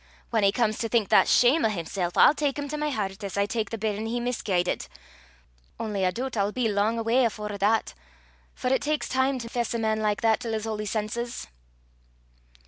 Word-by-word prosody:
Whan 225 -2 +2
he 200 -1 +4
comes 215 -1 0
to 230 - -2
think 225 -4 +1
that - - +5
shame 255 +7 +4
o' 220 - +4
himsel', 175 -2 -3
I'll - - +7
tak 290 -2 -1
him 290 0 -3
to 300 - -3
my 300 0 -1
hert, 205 -5 -3
as 200 0 -5
I 200 - +3
tak 220 +1 -2
the 225 - -4
bairn 215 0 -2
he 240 +2 -2
misguidit. 205 -7 -1 0.9
Only 205 -4 -1
I - - +3
doobt 255 +4 -4
I'll 200 -1 +1
be 245 0 0
lang 210 +2 +1
awa 230 +3 +2
afore 210 -2 -3
that, 215 +3 +1 0.6
for 250 - -2
it 265 - +1
taks 300 +1 -1
time 260 +1 +1
to 235 -2 -6
fess 235 0 -2
a - - +1
man 220 -1 0
like 210 -1 0
that 225 -1 +3
till 230 -3 -3
's 215 - -3
holy 215 -1 -3
senses." 230 +3 -3
225 Hz, 215 wpm, -26 LUFS, 210-245 Hz, 0.9 s, I'll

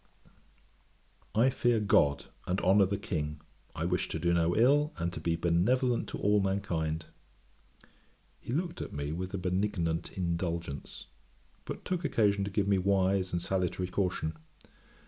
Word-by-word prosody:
I 120 +5 +4
fear 120 -3 +2
GOD, 70 -9 +3 0.2
and 90 +2 0
honour 95 +1 +5
the 100 +1 -1
King, 75 -6 -3 0.4
I 80 - -2
wish 90 0 0
to - - -3
do 85 +1 +1
no 85 0 +2
ill, 145 +6 +3
and 85 0 -2
to - - -5
be 85 -1 0
benevolent 115 +10 +1
to - - -4
all 105 0 +3
mankind.' 85 -5 -1 1.3
He - - -7
looked 170 +5 -2
at - - -6
me 70 0 -3
with 90 +3 -4
a - - -1
benignant 90 -3 -1
indulgence; 85 -4 -3 0.6
but - - -7
took 180 -1 -2
occasion 100 -7 +2
to - - -3
give 100 0 0
me 100 -1 +3
wise 95 0 +2
and 85 - 0
salutary 90 -1 -1
caution. 90 -4 -1
95 Hz, 150 wpm, -30 LUFS, 85-105 Hz, 1.3 s, honour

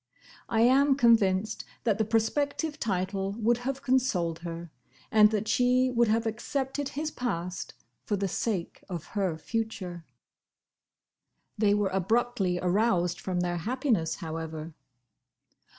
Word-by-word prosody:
I 225 - +2
am 270 +3 +5
convinced 215 -5 +3 0.2
that 220 -3 +1
the 220 - +2
prospective 285 +8 0
title 195 -1 -1
would 230 +2 +1
have 270 +2 -4
consoled 230 -11 +1
her, 170 -1 -7 0.4
and 210 -1 +7
that 215 0 -1
she 250 +2 +3
would 235 -1 +3
have 225 +2 +1
accepted 270 +5 -2
his 305 +2 -3
past 180 -7 -4 0.3
for 210 - -1
the 195 0 -1
sake 190 -2 -3
of 175 -4 -4
her 190 -6 0
future. 185 -3 -4 1.5
They 205 -1 +3
were 205 -2 +1
abruptly 195 0 +1
aroused 180 -1 +1
from 180 -2 -1
their 175 0 -1
happiness, 230 - 0
however. 160 -1 -6
215 Hz, 125 wpm, -28 LUFS, 180-245 Hz, 1.5 s, and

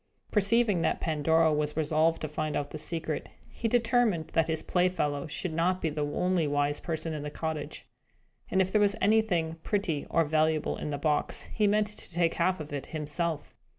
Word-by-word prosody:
Perceiving 210 -2 +3
that - - +1
Pandora 160 +1 +2
was 150 0 -1
resolved 160 +1 +2
to 155 - -2
find 155 0 -3
out 145 0 -2
the 155 - -5
secret, 160 0 -3 0.2
he 230 - -2
determined 225 -8 +2
that 165 -1 +1
his 160 -1 -2
playfellow 175 -6 0
should 160 +3 -3
not 180 +3 +1
be 160 - -1
the 150 0 -2
only 175 +2 +1
wise 145 0 0
person 160 -1 -3
in 150 - -4
the 150 - -4
cottage. 155 -1 -5 0.6
And 190 0 +3
if 190 - -5
there 210 - +3
were 205 - +5
anything 195 -8 +2
pretty 185 -9 -1
or 165 -1 +2
valuable 155 0 +1
in - - -5
the 145 - -2
box, 150 +1 0
he 210 -2 +2
meant 210 +1 +3
to 210 -3 -7
take 170 -1 +1
half 185 +1 +1
of 150 -1 -7
it 140 - -4
to - - -18
himself. 155 0 -3
160 Hz, 195 wpm, -29 LUFS, 150-185 Hz, 0.6 s, were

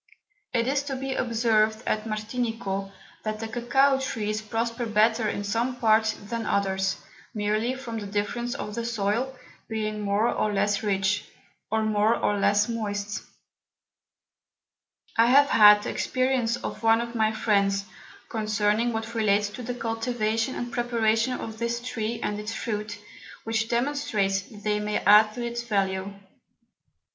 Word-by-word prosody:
It 235 -1 +1
is 275 +1 +1
to 275 -2 -3
be 265 0 -3
observed 220 -2 +1
at 215 0 -1
Martinico, 215 -3 -3 0.3
that 215 0 -3
the 225 - -4
Cocao 265 +4 +2
Trees 215 -4 -2
prosper 230 +2 -2
better 220 +1 +3
in 205 - -3
some 230 +5 -1
Parts 220 -2 +3
than 225 +2 -5
others, 190 -1 0 0.4
merely 215 +4 0
from 235 -4 -5
the 205 - -6
Difference 210 +4 -2
of 210 - -5
the 235 +2 -3
Soil, 230 +3 -1 0.3
being 215 -1 -3
more 205 +2 +1
or 215 -2 0
less 205 0 +1
rich, 200 -1 0 0.4
or 220 +1 +1
more 215 +1 +2
or 205 0 0
less 205 +1 +3
moist. 205 -3 -3 2.0
I 230 +1 +6
have 280 +3 +6
had 210 -1 +8
the - - -3
Experience 255 -3 0
of 215 - -6
one 225 0 +4
of 235 0 -4
my 220 -2 +2
Friends, 200 -2 +1 0.4
concerning 215 +1 0
what 225 +1 -4
relates 205 -2 +2
to 230 - -8
the 245 +1 -4
Cultivation 225 0 -1
and 240 0 -5
Preparation 235 0 +1
of 220 -3 -6
this 235 0 -1
Tree 235 -2 -3
and 210 0 -2
its 210 +2 -5
Fruit, 210 -2 -4 0.5
which 225 0 -1
demonstrates 235 -7 0
that 205 +1 -14
they 210 0 +1
may 210 0 -1
add 215 +1 +6
to 240 -1 -3
its 235 0 -3
Value. 195 -3 -1
220 Hz, 150 wpm, -26 LUFS, 210-235 Hz, 2.0 s, had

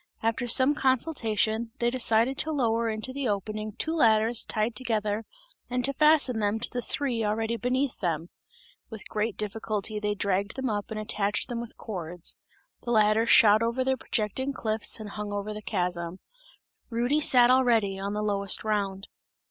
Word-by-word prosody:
After 230 +2 0
some 260 +4 +4
consultation, 230 -5 0
they 235 0 +1
decided 240 0 +2
to 315 - 0
lower 230 -5 0
into 220 +4 -4
the 275 -1 -2
opening 215 +1 -3
two 320 +9 -3
ladders 225 -5 +3
tied 215 +1 -2
together 215 -2 -2 0.4
and 250 0 0
to 275 - +1
fasten 300 -5 +3
them 210 +1 0
to 230 - -3
the 245 - -3
three 245 -3 -1
already 220 +2 -1
beneath 255 +3 -1
them. 165 -2 -2 0.6
With 220 -2 -9
great 215 0 -2
difficulty 215 0 -3
they 210 0 -1
dragged 200 +1 -1
them 265 -3 -2
up 205 -1 -3
and 220 - -4
attached 210 -1 -1
them 235 -1 -3
with 235 - -10
cords; 180 -4 -6 0.5
the - - -7
ladders 220 0 +3
shot 215 0 +7
over 235 +3 0
the 265 0 +1
projecting 260 +3 -2
cliffs 220 -3 +2
and 210 -2 -7
hung 210 0 -5
over 205 +1 -4
the 210 - -7
chasm; 180 -3 -3 0.7
Rudy 245 +6 +1
sat 250 -4 +5
already 230 -7 +2
on 200 +1 -3
the 210 0 -2
lowest 200 -2 +2
round. 200 -2 -2
220 Hz, 170 wpm, -27 LUFS, 210-245 Hz, 0.7 s, shot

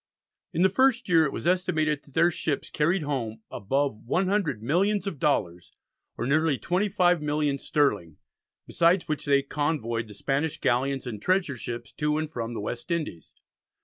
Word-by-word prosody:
In 175 0 +1
the 190 - +6
first 260 +3 +2
year 165 -3 +5
it 140 - -1
was - - -6
estimated 155 -4 +1
that 140 - -20
their 170 +2 +4
ships 155 -3 -3
carried 165 +3 +1
home 115 -6 -3
above 135 +2 -1
100 180 - 0
millions 195 - +1
of 195 -8 -4
dollars, 90 - -1 0.4
or 120 - -2
nearly 150 +1 +2
25 180 -1 +1
millions 150 -2 0
sterling, 105 - 0 0.5
besides 170 +2 +2
which 155 -1 -3
they 140 -1 +3
convoyed 140 -6 -2
the 105 - -12
Spanish 145 +7 -1
galleons 135 +2 0
and 110 -5 -6
treasure 185 - +1
ships 120 -1 -6
to 150 0 -1
and 155 0 -3
from 120 -4 -4
the - - -3
West 120 - -5
Indies. 155 - -4
150 Hz, 165 wpm, -26 LUFS, 125-170 Hz, 0.5 s, the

